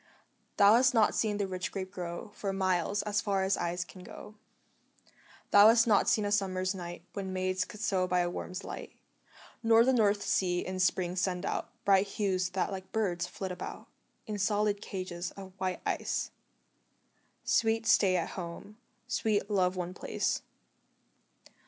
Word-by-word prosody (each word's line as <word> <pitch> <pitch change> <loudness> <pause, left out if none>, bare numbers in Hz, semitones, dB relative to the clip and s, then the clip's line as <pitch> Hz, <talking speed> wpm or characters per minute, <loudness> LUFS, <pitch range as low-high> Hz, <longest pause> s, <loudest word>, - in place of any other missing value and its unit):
Thou 200 +1 +7
hast 250 +2 +4
not 220 -2 +4
seen 210 -2 0
the 205 - 0
rich 185 -1 -4
grape 190 -1 -5
grow 175 0 -6
For 200 -2 -3
miles, 190 +1 0
as 205 -1 0
far 195 -2 0
as 190 +1 +2
eyes 175 +1 -2
can 180 +3 -13
go; 210 - -11 1.2
Thou 205 +1 +9
hast 230 +1 +6
not 215 -4 +4
seen 215 - +2
a 205 - -1
summer's 185 -2 0
night 175 -2 -7
When 195 -2 -4
maids 185 0 -1
could 210 - -11
sew 190 -5 +1
by 180 0 +2
a 175 - 0
worm's 185 +1 -6
light; - - -8 0.7
Nor 225 0 +5
the 260 - +3
North 205 -4 +3
Sea 180 -2 0
in 185 0 -4
spring 185 -1 +1
send 180 -1 -1
out - - -2 0.2
Bright 195 0 +4
hues 190 -3 -1
that 190 - 0
like 190 -1 -7
birds 180 -6 -1
flit 190 +1 -5
about 180 - -7 0.4
In 210 -1 -4
solid 205 0 +1
cages 185 -3 -5
of 190 -1 -9
white 185 -1 -2
ice - - -1 1.1
Sweet 225 -1 +2
Stay 195 -4 +4
at 170 - -2
Home, 190 +4 -8 0.3
sweet 215 -4 0
Love 185 -2 +2
one 180 0 -4
place. - - -2
190 Hz, 165 wpm, -30 LUFS, 185-205 Hz, 1.2 s, Thou